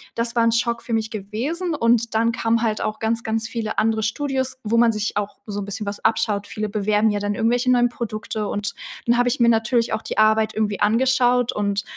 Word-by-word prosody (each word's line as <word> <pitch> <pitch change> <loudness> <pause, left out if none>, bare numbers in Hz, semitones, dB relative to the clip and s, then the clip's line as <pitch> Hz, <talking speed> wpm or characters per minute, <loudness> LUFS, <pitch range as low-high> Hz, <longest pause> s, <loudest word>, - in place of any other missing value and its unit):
das 230 +1 0
war 235 - +3
'n 230 - +3
Schock 235 0 0
für 235 - -8
mich 220 -1 0
gewesen 245 - -3
und 235 -3 +2
dann 230 +1 +2
kamen 230 0 +1
halt 220 -2 0
auch 215 - -3
ganz, 225 +1 -1
ganz 220 0 -1
viele 225 -2 -4
andere 220 0 +1
Studios, 260 +2 -1
wo 220 +1 0
man 235 0 +5
sich 215 -1 -3
auch 205 -1 -3
so 205 -1 -4
'n - - -5
bisschen 210 +2 -4
was 200 0 -5
abschaut. 205 -2 +1
Viele 215 0 -4
bewerben 210 +1 +1
ja 205 -1 -1
dann 205 0 -1
irgendwelche 245 +4 +1
neuen 245 -1 +4
Produkte 215 -2 -4
und 205 0 -2 0.3
dann 240 0 +3
habe 245 0 +3
ich 260 - -2
mir 235 - +4
natürlich 230 +1 +1
auch 220 - -1
die - - -6
Arbeit 215 0 +3
irgendwie 210 -2 -1
angeschaut 245 +2 +3
und 200 -1 -1
225 Hz, 225 wpm, -22 LUFS, 215-235 Hz, 0.3 s, man